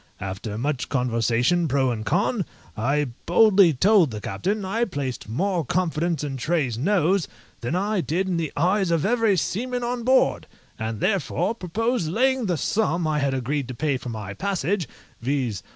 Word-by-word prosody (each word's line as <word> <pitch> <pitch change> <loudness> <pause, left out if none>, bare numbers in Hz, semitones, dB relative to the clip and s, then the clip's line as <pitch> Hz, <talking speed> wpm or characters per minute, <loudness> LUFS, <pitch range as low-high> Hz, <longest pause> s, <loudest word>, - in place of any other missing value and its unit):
After 95 +3 -5
much 135 +2 -2
conversation 125 +6 +1
pro 135 -2 +2
and 110 -2 -3
con, 195 - +1 0.3
I 140 +5 0 0.2
boldly 195 0 +6
told 185 - +4
the 110 -2 -5
captain 190 - -2
I 220 +5 0
placed 140 - -4
more 175 - 0
confidence 165 -2 -1
in 140 -2 -3
Tray's 140 -3 0
nose 180 - +2 0.3
than 120 +8 -2
I 200 +1 0
did 175 +4 -1
in 180 -2 0
the 160 -3 -2
eyes 185 +4 +2
of 165 -3 +1
every 225 -3 +2
seaman 245 +8 -2
on 240 0 -2
board, 260 +2 +3 0.3
and 110 -1 -4
therefore 190 0 0
proposed 225 0 -1
laying 255 +4 +1
the 175 -3 0
sum 175 0 0
I 155 -1 +1
had 140 -1 0
agreed 135 +1 -2
to 130 - -6
pay 145 +1 0
for 125 -1 -5
my 105 -4 -5
passage 190 - -1 0.3
(viz. 125 -6 -1
165 Hz, 170 wpm, -24 LUFS, 130-200 Hz, 0.3 s, boldly